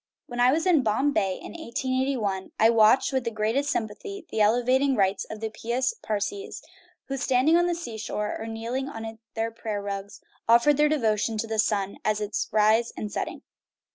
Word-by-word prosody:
When 245 0 -7
I 245 +1 +5
was 320 +5 0
in 345 -6 +4
Bombay, 215 -4 +1
in - - -8
1 - - -9
88 260 +1 -1
1, 195 -4 -3
I 225 +1 +6
watched 225 +4 +4
with 260 -1 +1
the 230 - -1
greatest 225 +6 0
sympathy 265 - -4
the 220 - 0
elevating 255 +5 +3
rites 195 -2 +1
of 215 0 -8
the 220 -1 -3
pious 240 +4 -1
Parsees, 220 - -3 0.4
who, 275 - -4
standing 265 +5 +3
on 350 +1 +4
the 350 - 0
sea 235 -10 -6
shore, 210 -1 -3
or 225 - -6
kneeling 235 +4 -3
on 225 -2 -7 0.2
their 225 0 -1
prayer 220 -2 -4
rugs, 200 0 -6 0.3
offered 240 +5 +5
their 300 0 +4
devotion 225 -6 +1
to 215 - -1
the 220 -1 -2
sun 200 -2 0
at 215 0 +1
its 210 0 -2
rise 220 +2 +3
and 210 - -4
setting. - - -4
225 Hz, 195 wpm, -26 LUFS, 215-265 Hz, 0.4 s, I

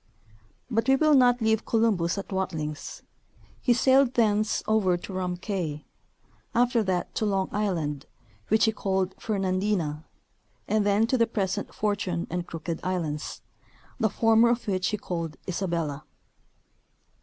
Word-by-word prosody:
But 225 +1 +1
we 265 - +6
will 310 +2 +4
not 245 -3 +5
leave 220 0 +2
Columbus 205 -6 +1
at 200 - -6
Watlings; 160 -6 -4 0.6
he 250 - +2
sailed 260 +1 +4
thence 215 -2 +2
over 210 -5 +2
to 190 - -9
Rum 180 -1 -2
cay; 175 -6 -4 0.7
after 245 0 +3
that 185 -4 -1
to 220 - -1
Long 195 -2 0
island, 165 -9 -2 0.4
which 220 +1 +4
he 220 - +3
called 190 -3 -1
Fernandina, 185 -6 -1 0.6
and 215 -1 +1
then 205 +2 +3
to 250 +2 0
the 230 - +4
present 200 -2 -2
Fortune 200 -5 -1
and 180 0 -3
Crooked 165 0 -5
islands, 165 -5 -3 0.6
the 220 - +2
former 225 +2 +4
of 235 -1 -1
which 185 -2 0
he 210 - -1
called 165 -5 -4
Isabella. 170 -6 -2
195 Hz, 140 wpm, -27 LUFS, 175-220 Hz, 0.7 s, we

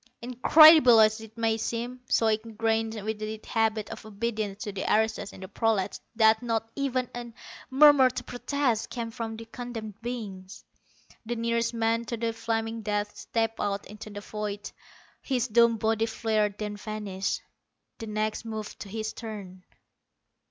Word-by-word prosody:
Incredible 255 +1 +7
as 220 +1 +4
it 220 +1 -13
may 225 -1 +1
seem, 240 +3 -4
so 225 - +3
ingrained 225 0 0
was 215 +1 -3
the 215 0 -5
habit 220 -1 0
of - - -8
obedience 215 -1 -3
to 205 - -4
the 195 -1 -4
aristos 220 -2 +1
in - - -13
the 190 - -7
prolats 210 -1 0 0.2
that 220 -1 +5
not 225 -2 -1
even 260 -3 -1
a 240 -1 -6 0.4
murmur 275 -1 +7
of 255 - -4
protest 245 -2 -1
came 235 -2 -4
from 225 -1 -5
the 230 - -8
condemned 225 -3 -7
beings. 205 -6 -7 0.6
The 240 - -1
nearest 230 0 0
man 230 +1 +1
to 235 +1 -4
the 230 0 -1
flaming 225 0 -2
death 210 -1 -2
stepped 225 -1 -2
out 200 0 -2
into 210 +1 -10
the 205 0 -7
void. 210 -1 -5 0.5
His 250 -3 0
doomed 235 0 +4
body 225 +1 +1
flared, 215 -2 0
then 210 -1 -4
vanished. 205 -3 -3 0.6
The 225 - -6
next 215 +1 -2
moved 220 -2 -6
to 200 - -8
his 220 +1 -4
turn. 200 -5 -8
225 Hz, 160 wpm, -27 LUFS, 215-235 Hz, 0.6 s, Incredible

